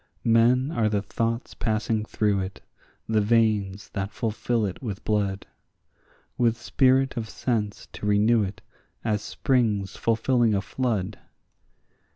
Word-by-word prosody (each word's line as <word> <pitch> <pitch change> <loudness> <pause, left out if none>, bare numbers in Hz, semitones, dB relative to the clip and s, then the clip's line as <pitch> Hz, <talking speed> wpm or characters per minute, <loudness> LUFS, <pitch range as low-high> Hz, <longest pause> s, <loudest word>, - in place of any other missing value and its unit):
Men 120 +4 +4
are 110 -7 +1
the 105 -1 0
thoughts 115 +2 -2
passing 110 -1 -1
through 105 -2 +1
it, 95 0 -5 0.5
the 110 -1 +2
veins 105 -3 +1
that 100 -1 -3
fulfil 115 0 -1
it 95 - -5
with 105 -7 -5
blood, 100 -2 0 0.9
With 115 -2 +3
spirit 130 +2 +2
of 110 -2 -3
sense 110 -5 -2
to 105 - -5
renew 105 +3 +4
it 100 -1 -4 0.4
as 105 -2 +1
springs 105 -5 0
fulfilling 115 -1 +2
a 100 - +1
flood. 110 -6 -2
110 Hz, 130 wpm, -25 LUFS, 105-115 Hz, 0.9 s, Men